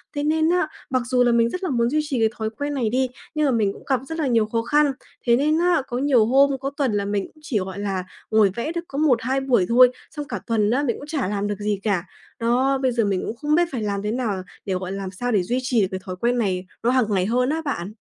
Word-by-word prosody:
Thế 290 - -1
nên 315 +1 +2
á, 355 -2 +2 0.2
mặc 255 -1 +1
dù 250 +1 +2
là 240 - +3
mình 235 0 +3
rất 365 +9 -5
là 370 - -1
muốn 235 -3 +1
duy 305 - +1
trì 280 -5 -2
cái 220 -1 +3
thói 220 -1 -2
quen 285 +6 -4
này 245 -6 0
đi, 260 +2 +1 0.3
nhưng 305 0 +2
mà 275 - +3
mình 215 -5 +1
cũng - - -14
gặp 260 -2 +2
rất 325 +2 -5
là 300 - +1
nhiều 230 -3 +3
khó 230 +2 -1
khăn. 290 +4 +3 0.4
Thế 235 - +6
nên 305 +5 +2
á, 350 -2 +3
có 245 - -3
nhiều 260 -4 +3
hôm, 275 +4 +4
có 270 +1 -2
tuần 275 -5 +1
là 200 -1 0
mình 200 -1 -1
cũng 310 - -22
chỉ, 255 -8 -1
gọi 190 +1 -5
là, 195 -2 -2 0.3
ngồi 215 -3 +4
vẽ 235 +7 -2
được 340 0 -3
có 275 - -7
1-2 265 -3 +2
buổi 255 -8 +2
thôi, 250 +1 +7 0.2
xong 295 -2 -5
cả - - -3
tuần 215 -3 +2
á, 270 +4 +1
mình 240 -5 0
cũng 290 - -10
chả 295 -8 -1
làm 205 0 -1
được 205 -1 -3
gì 205 -1 -1
cả. 200 -5 +1 0.4
Đó, 250 +4 +2
bây 260 -1 +1
giờ 235 -2 +1
mình 195 -2 0
cũng 225 - -4
không 295 +5 0
biết 345 - +4
phải 250 -5 -3
làm 200 -1 -2
thế 210 +1 -2
nào 220 -6 -1 0.2
để 195 - -1
gọi 185 0 -3
làm 195 -1 -4
sao 245 +6 -3
để 205 -5 +2
duy 245 +8 -1
trì 250 -3 +1
được 190 - +2
cái 190 - -3
thói 185 - -6
quen 240 +6 0
này 190 -5 -1 0.2
nó 235 - +3
hàng 255 -1 +3
ngày 190 -3 +1
hơn 250 +4 +1
á 315 +2 -1
bạn. 205 -8 -3
240 Hz, 290 wpm, -23 LUFS, 210-275 Hz, 0.4 s, thôi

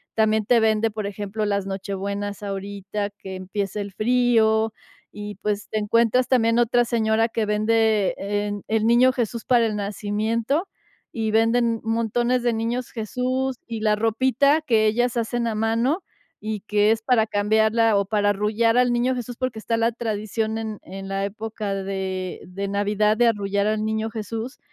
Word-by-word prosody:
también 220 -1 +2
te 245 -2 +5
vende, 220 0 +2
por 215 -1 -5
ejemplo, 205 +1 -3
las 200 -1 -1
Nochebuenas 200 +1 -4
ahorita, 200 +1 -4
que 190 -1 -7
empieza 195 +2 -4
el 200 0 -6
frío 225 -1 +2 0.4
y, 210 -1 -7
pues, 210 0 -2
te 220 - -2
encuentras 230 +4 +2
también 230 -3 +3
otra 240 0 +3
señora 225 -1 +2
que 225 -1 -1
vende, 215 -1 +2
eh, 205 +1 -2
en, 205 0 -3
eh, - - -18
el 220 +1 +1
niño 245 +2 +5
Jesús 235 -3 -3
para 240 -2 +4
el 215 - -3
nacimiento 215 - -1 0.5
y 220 -2 -1
venden 230 +1 +3
m 225 - -9
montones 235 +2 0
de 240 - +2
niños 235 +2 -2
Jesús 255 +3 -2
y 230 -2 -4
la 215 -1 +3
ropita 260 +7 +2
que 225 -7 +2
ellas 240 +3 +1
hacen 235 +1 -1
a 225 - -2
mano 230 - 0 0.4
y 215 0 -4
que 210 +1 +3
es 225 0 +1
para 225 -1 +3
cambiarla 220 +1 +2
o 200 - +1
para 205 0 +1
arrullar 215 +3 +1
al 250 0 +4
niño 245 +2 +1
Jesús, 245 -1 -5
porque 255 -3 -3
está 230 +1 -1
la 230 +1 +2
tradición 220 -1 -2
en 220 -2 -5
en 195 +1 -8
la 195 0 -2
época 210 0 -4
de 190 -1 -4
de 195 +2 -5
Navidad 205 +2 +1
de 240 0 +4
arrullar 200 -2 0
al 215 0 0
niño 220 0 -1
Jesús. 225 +3 -5
220 Hz, 175 wpm, -23 LUFS, 205-235 Hz, 0.5 s, te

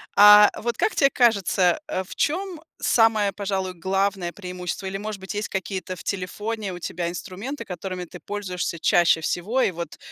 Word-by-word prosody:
А, 210 0 +9
вот 235 0 -3
как 440 - +1
тебе 275 -1 +4
кажется, 200 - +3
а 185 - -2
в - - -10
чем 355 +1 -1 0.2
самое, 220 -3 +3
пожалуй, 190 -2 -2
главное 190 0 -1
преимущество 180 0 -6
или, 190 0 -4
может 210 0 -5
быть, 190 0 -7
есть 210 +1 -3
какие-то 190 -1 -4
в - - -10
телефоне 205 +2 -3
у 175 - -7
тебя 170 0 -3
инструменты, 210 +8 -6
которыми 180 0 -5
ты 180 +1 -11
пользуешься 185 -4 -3
чаще 170 0 +4
всего 200 +10 -1
и 200 - +2
вот 170 -2 -7
195 Hz, 170 wpm, -24 LUFS, 180-215 Hz, 0.2 s, А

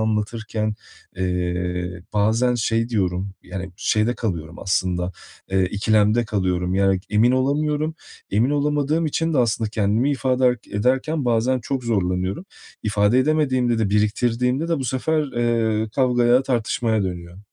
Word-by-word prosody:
anlatırken, 110 0 -1 0.4
eee, 90 -1 -2
bazen 110 +4 +2
şey 115 0 0
diyorum, 95 -3 -1
yani 95 0 -6
şeyde 110 +2 +1
kalıyorum 85 -5 -4
aslında, 90 -1 -1 0.4
eee, 95 -1 +2
ikilemde 105 +3 +2
kalıyorum. 90 -3 -1
Yani, 95 -1 +2
emin 115 +4 +4
olamıyorum. 150 +4 0 0.4
Emin 115 +7 +2
olamadığım 150 +2 +1
için 165 +1 -1
de - - +2
aslında 115 -2 +1
kendimi 110 +5 +1
ifade 130 -2 +1
ed 125 - +1 0.2
ederken 130 +7 0
bazen 120 +2 +1
çok 130 +1 -3
zorlanıyorum. 95 - -1 0.4
İfade 105 +3 +2
edemediğimde 130 -5 +2
de, 105 -3 0
biriktirdiğimde 120 +7 +1
de, 165 -3 +1
bu 135 - -3
sefer, 150 +5 0
eee, 115 -2 0
kavgaya, 125 -1 +3
tartışmaya 115 -3 0
dönüyor. 90 -1 -5
110 Hz, 130 wpm, -22 LUFS, 100-130 Hz, 0.4 s, emin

